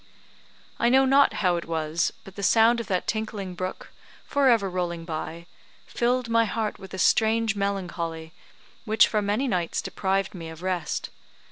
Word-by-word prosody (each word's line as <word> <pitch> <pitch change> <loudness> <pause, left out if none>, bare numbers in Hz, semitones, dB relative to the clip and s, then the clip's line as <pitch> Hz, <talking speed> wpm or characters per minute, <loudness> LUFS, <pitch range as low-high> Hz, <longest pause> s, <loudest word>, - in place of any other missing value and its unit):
I 235 - +3
know 265 +2 +5
not 275 +1 +5
how 175 -1 +3
it 170 - -5
was, 160 0 -1
but 195 - -13
the 200 - -6
sound 230 +3 +4
of 230 - -5
that 185 -2 -1
tinkling 215 -4 -3
brook, 185 +1 -6 0.3
for 280 -2 +2
ever 225 -5 +3
rolling 175 -2 -3
by, 165 +1 -5 0.4
filled 245 0 0
my 230 0 +3
heart 220 -1 -3
with 190 -1 -9
a - - -6
strange 220 +2 +3
melancholy, 170 -5 -3 0.5
which 220 -1 +4
for 215 - 0
many 210 +7 0
nights 180 -7 -1
deprived 195 0 -1
me 165 -3 -7
of 160 +2 -11
rest. 180 -4 -2
195 Hz, 165 wpm, -25 LUFS, 175-225 Hz, 0.5 s, know